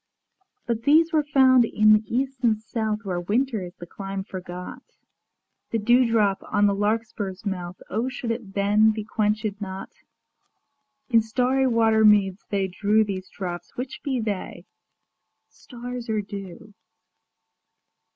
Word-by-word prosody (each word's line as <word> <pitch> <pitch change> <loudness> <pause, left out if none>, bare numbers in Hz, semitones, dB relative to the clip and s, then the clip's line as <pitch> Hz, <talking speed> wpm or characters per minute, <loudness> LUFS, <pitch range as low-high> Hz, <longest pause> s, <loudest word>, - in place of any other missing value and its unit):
But 235 -1 -2
these 320 +6 +4
were 310 - +4
found 265 -4 +5
in 215 -1 +4
the 215 - +4
East 265 +3 -2
and 220 -3 +3
South 220 -1 -3
Where 180 -2 -2
Winter 225 +4 0
is 175 -1 -8
the 175 - -10
clime 195 +2 -6
forgot. 180 -2 -8
ŌĆö - - -43 0.8
The - - +3
dewdrop 225 -3 +3
on 205 - +1
the 200 - +3
larkspur's 205 -2 -2
mouth 180 -2 -4
O 225 +6 -1
should 245 -3 -4
it 225 -4 -6
then 205 +2 +4
be 215 -1 -2
quench├©d 210 -1 -1
not? 190 -1 -6 1.2
In 230 -1 +6
starry 250 +4 +1
water 225 -2 +3
meads 205 -2 +4
they 195 -2 0
drew 210 +3 +2
These 190 -3 -5
drops: 175 -3 -7
which 255 +2 -5
be 270 -4 -1
they? 210 -4 -4 0.8
stars 245 -1 -8
or 215 -1 0
dew? 200 0 -9
215 Hz, 140 wpm, -24 LUFS, 195-235 Hz, 1.2 s, In